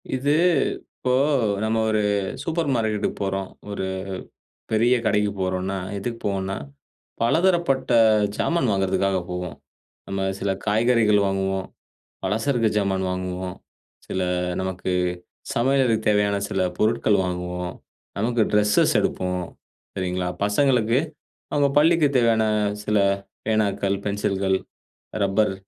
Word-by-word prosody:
இது, 140 +3 0 0.7
இப்போ 125 - 0 0.5
நம்ம 110 +1 +1
ஒரு 110 -1 +2 0.4
சூப்பர் 165 -1 -1
மார்க்கெட்டுக்கு 110 -3 -1
போறோம். 95 0 -2 0.2
ஒரு 100 -2 -3 0.9
பெரிய 115 +3 +4
கடைக்கு 105 -1 +2
போறோன்னா, 95 +1 -1 0.2
எதுக்கு 115 +4 -4
போவோம்னா? 95 -1 -1 0.7
பலதரப்பட்ட 170 +2 +2 0.5
ஜாமான் 165 -7 +1
வாங்குறதுக்காக 95 0 +1
போவோம். 90 0 -4 0.5
நம்ம 95 0 -3 0.2
சில 100 0 0
காய்கறிகள் 110 -1 +3
வாங்குவோம். 95 0 -1 0.6
பலசரக்கு 115 +3 +1
ஜாமான் 95 -2 0
வாங்குவோம். 90 0 -4 0.5
சில 95 - -2 0.4
நமக்கு 95 0 -3 0.6
சமையலுக்கு 130 -1 +2
தேவையான 105 -1 +2
சில - - 0 0.2
பொருட்கள் 110 -1 +2
வாங்குவோம். 90 0 -4 0.5
நமக்கு 120 +2 +1
ட்ரெஸ்ஸஸ் 105 0 +3
எடுப்போம். 90 -1 -1 0.5
சரிங்களா, 90 -1 -2 0.2
பசங்களுக்கு, 120 +2 +3 0.5
அவங்க 145 -1 +3
பள்ளிக்குத் 155 -3 +3
தேவையான 115 -2 +3 0.4
சில 105 0 +1 0.5
பேனாக்கள், 100 -2 +1
பென்சில்கள், 100 -2 0 0.7
ரப்பர் 100 +1 +2
105 Hz, 100 wpm, -23 LUFS, 95-115 Hz, 0.9 s, பெரிய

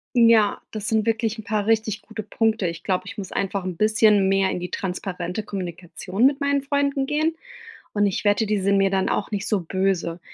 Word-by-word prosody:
Ja, 230 -3 +5
das 215 -1 -4
sind 220 -1 +1
wirklich 225 0 0
'n 220 - -7
paar 210 0 -1
richtig 220 -1 +1
gute 220 -1 -7
Punkte. 220 -1 0
Ich 170 0 -5
glaube, 185 -2 -1
ich - - -8
muss 195 -3 -7
einfach 195 -1 -2
'n 180 -3 -5
bisschen 215 -2 +4
mehr 195 0 +2
in - - -3
die 180 0 -5
transparente 180 0 -4
Kommunikation 185 +2 -2
mit 275 0 +2
meinen 280 -1 +1
Freunden 280 -1 0
gehen. 310 +3 0 0.6
Und 205 0 +2
ich 195 - -2
wette, 205 +2 +3
die 210 0 +1
sind 200 +1 +2
mir 195 0 +4
dann 190 -1 0
auch 200 - -1
nicht 205 -2 -3
so 210 -3 +1
böse. 180 -1 -1
205 Hz, 210 wpm, -23 LUFS, 190-225 Hz, 0.6 s, Ja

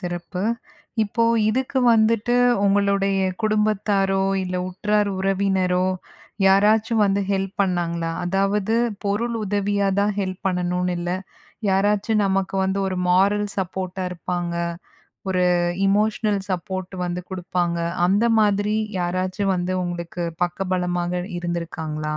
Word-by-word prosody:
சிறப்பு. 175 0 -4 0.6
இப்போ 230 +2 0 0.2
இதுக்கு 260 +4 0
வந்துட்டு 230 +1 +3 0.3
உங்களுடைய 200 -1 +2 0.2
குடும்பத்தாரோ 210 -2 +1 0.2
இல்ல, 185 0 -4
உற்றார், 210 +3 0
உறவினரோ 190 -1 +1 0.6
யாராச்சும் 210 +3 +4
வந்து 200 0 +1
ஹெல்ப் 195 -1 -1
பண்ணாங்களா? 170 -3 -1
அதாவது 195 +3 +1 0.3
பொருள் 230 +4 0
உதவியா 200 0 0
தான் 205 +1 +2
ஹெல்ப் 185 -1 -3
பண்ணணும்னு 180 -1 0
இல்ல, 175 0 -3 0.6
யாராச்சும் 205 +3 +2
நமக்கு 195 0 0
வந்து 190 +1 0
ஒரு 185 -1 -3
மோரல் 200 +3 +3
சப்போர்ட்டா 185 0 -3
இருப்பாங்க. 175 0 -3 0.8
ஒரு 180 -1 +2 0.4
எமோஷனல் 210 0 +1
சப்போர்ட் 185 +1 -3
வந்து 175 0 -3
குடுப்பாங்க. 175 -2 -1 0.3
அந்த 200 +5 +2 0.2
மாதிரி 205 0 +2 0.2
யாராச்சும் 185 +2 -1
வந்து 180 +1 -1
உங்களுக்கு 175 0 -4 0.2
பக்க 180 +2 -4
பலமாக 180 0 -1 0.2
இருந்துருக்காங்களா? 160 -3 -3
190 Hz, 110 wpm, -22 LUFS, 180-205 Hz, 0.8 s, யாராச்சும்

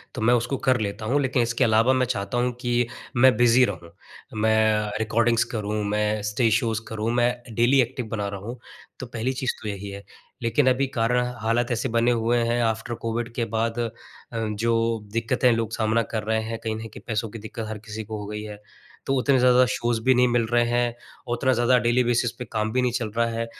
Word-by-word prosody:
तो - - -4
मैं 120 +2 +4
उसको 120 +3 0
कर 130 -2 +4
लेता 100 +1 -4
हूँ 135 +6 +1
लेकिन 130 -2 +1
इसके 120 0 0
अलावा 115 +3 +4
मैं 130 0 +2
चाहता 120 -1 -3
हूँ 125 +1 +1
कि 120 -1 +1 0.3
मैं 130 0 +6
बिज़ी 120 +1 +5
रहूँ। 85 -5 -6 0.5
मैं 110 -1 +2
रिकॉर्डिंग्स 115 +1 +2
करूँ 105 0 -2
मैं 105 0 0
स्टेज 110 0 +2
शोज़ 115 -1 0
करूँ 110 +1 -2
मैं 120 0 +3 0.2
डेली 125 +4 +4
एक्टिव 125 +1 -3
बना 105 -2 -2
रहा 100 0 -5
हूँ, 115 +5 -7 0.4
तो - - -5
पहली 120 +2 -3
चीज़ 130 -1 -1
तो 110 - -6
यही 100 0 -5
है। 100 +1 -8 0.4
लेकिन 120 +4 +2
अभी 130 +2 +1
कारणा 120 +2 +2 0.2
हालात 115 +2 0
ऐसे 115 - -1
बने 115 +1 +2
हुए 120 0 +1
हैं 120 +1 +1
आफ़्टर 115 +1 -1
कोविड 115 0 -3
के 120 -1 -1
बाद 115 +1 -1
अ, 115 -1 0 0.5
जो 115 +1 0
दिक्कतें 115 +2 +2
लोग 115 -1 -1
सामना 110 0 +1
कर 110 - -1
रहे 110 +1 0
हैं 115 0 -5
कहीं 110 -1 -2
न - - -6
कहीं 110 - -12
पैसों 110 -1 -2
की 115 +2 -8
दिक्कत 110 +1 -6
हर 110 - -4
किसी 110 +1 -7
को 110 +1 -6
हो 105 - -6
गई 105 0 -5
है। 105 -1 -9 0.4
तो 135 - 0
उतने 135 +1 +3
ज़्यादा 125 0 +5
शोज़ 120 -1 0
भी 130 +1 +5
नहीं 125 0 +4
मिल 120 -1 +1
रहे 120 0 +4
हैं, 120 0 0 0.4
उतना 130 +2 +2
ज़्यादा 125 +1 +3
डेली 120 +2 +2
बेसिस 120 0 +1
पे 125 - -4
काम 110 -1 -1
भी 130 - +2
नहीं 125 -1 +1
चल 120 -3 -2
रहा 115 - +3
है। 115 0 -2
115 Hz, 220 wpm, -24 LUFS, 110-120 Hz, 0.5 s, मैं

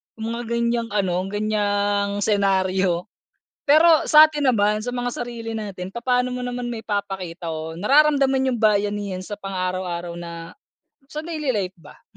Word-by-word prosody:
yung 225 +1 -4
mga 235 +1 -3
ganyang 235 0 0
ano, 185 -3 +1
ganyang 205 -1 0
senaryo. 190 -3 +1 0.6
Pero 315 +2 +6
sa'tin 300 -1 +6
naman 210 -2 +2
sa 245 - -3
mga 245 0 -2
sarili 235 -2 -6
natin 195 -4 -5
papaano 250 +2 0
mo 250 0 -4
naman 245 0 -4
maipapakita 195 -6 -4
o 160 0 -4
nararamdaman 270 +1 +3
yung 235 - -3
bayanihan 205 -3 0
sa 205 - -5
pang 195 -1 -5
araw-araw 180 -2 -3
na 170 -1 -8 0.5
sa 305 +2 -6
daily 310 -5 -2
life 190 -2 -2
ba? 145 -2 -17
210 Hz, 145 wpm, -22 LUFS, 190-245 Hz, 0.6 s, Pero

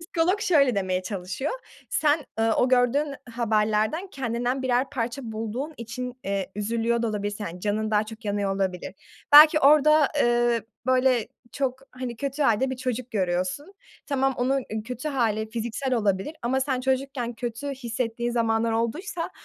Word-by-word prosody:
Psikolog 335 +4 0
şöyle 280 - +3
demeye 185 -2 -1
çalışıyor, 185 +6 -4 0.4
sen, 300 -1 +2
ııı, 225 0 +3
o 250 - +3
gördüğün 260 +4 +2 0.2
haberlerden 220 - +1
kendinden 245 -1 -2
birer 255 +1 +1
parça 245 -1 -3
bulduğun 225 +8 -4
için, 245 +2 -6
eee, 195 -1 -2
üzülüyor 230 +3 0
da 230 - +1
olabilirsin. 205 0 -3
Hani, 175 +2 -7
canın 215 +2 -1
daha 215 0 +2
çok 220 +1 -11
yanıyor, 200 -1 -1
olabilir. 185 -2 -2 0.4
Belki 305 +1 +9
orada, 300 +1 +6
eee, 240 -1 +2 0.2
böyle, 255 -3 +3 0.2
çok, 265 -2 -2
hani, 250 -2 -6
kötü 280 +3 -2
hâlde 260 +1 +2
bir 260 - -3
çocuk 255 -1 -3
görüyorsun. 185 - -2 0.3
Tamam, 270 -2 +1
onun 260 +1 0 0.2
kötü 250 +5 -5
hâli 220 -6 0
fiziksel 235 +3 -2
olabilir 210 +6 0
ama 260 +3 +1
sen 260 -2 -1
çocukken 265 -2 -1
kötü 240 +4 -5
hissettiğin 240 -2 -3
zamanlar 225 -1 +1
olduysa 320 - -2
240 Hz, 150 wpm, -25 LUFS, 220-270 Hz, 0.4 s, Belki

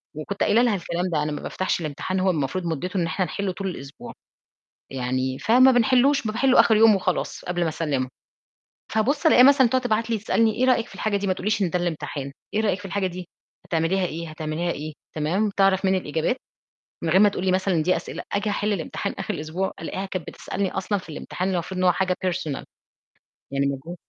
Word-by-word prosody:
وكنت 180 +6 -3
قايلة 230 - +4
لها 240 -4 +3
الكلام 175 0 -2
ده، 150 -1 +1
أنا 150 - -2
ما 150 - -4
بافتحش 185 - -2
الامتحان، 165 +5 -3
هو 190 - +2
المفروض 175 +2 -1
مُدته 170 +4 -3
إن 170 - +1
احنا 165 +3 -1
نحله 190 +3 -3
طول 195 +1 -5
الأسبوع. 140 -6 -8 0.8
يعني، 130 0 -2
فما 255 +5 +5
بنحلهوش، 255 +2 +3
ب - - 0
باحله 260 +4 +4
آخر 220 - +5
يوم 220 -1 +7
وخلاص 185 -1 -2
قبل 175 -1 -2
ما 165 - +2
أسلمُه. 145 -5 -1 0.8
فابُص 280 +9 +1
ألاقيها 250 -5 +7
مثلًا 275 -2 +6
تقعد 260 +2 +2
تبعت 230 -1 0
لي 225 - +1
تسألني: 220 +1 +2
"إيه 245 - +1
رأيِّك 245 -2 +2
في - - -14
الحاجة 215 -2 -1
دي؟" 200 0 -2
ما 185 - +2
تقوليش 210 +2 -1
إن 180 - +1
ده 180 - 0
الامتحان. 150 -5 -4 0.2
"إيه 215 - +2
رأيِّك 205 -4 +1
في 200 - -12
الحاجة 195 0 -1
دي؟ 180 -1 -6 0.4
هتعمليها 170 +3 +1
إيه؟ 165 -1 -4
هتعمليها 155 +2 -3
إيه؟" 155 +1 -6 0.2
تمام؟ 180 +8 0
تعرف 195 -1 +3
مني 190 0 +3
الإجابات 160 - -1 0.7
من 165 - 0
غير 190 +4 +5
ما 210 - +7
تقول 195 -2 -4
لي 185 - +3
مثلًا 190 0 +1
إن 160 - +2
دي 180 +3 +2
أسئلة. - - -6
آجي 205 +1 0
أحل 210 +1 0
الامتحان 170 -6 -3
آخر - - -3
الأسبوع، 160 +5 -3
ألاقيها 190 +4 -4
كانت 185 -3 -5
بتسألني 195 -1 -3
أصلًا 195 +2 -1
في 185 - -13
الامتحان، 185 +4 -3
المفروض 180 +2 -3
إن 185 - +1
هو 180 - +6
حاجة 185 0 0
personal. 165 -6 -2 0.9
يعني 140 0 0
مجهود، 140 +6 -5
185 Hz, 210 wpm, -24 LUFS, 160-210 Hz, 0.9 s, يوم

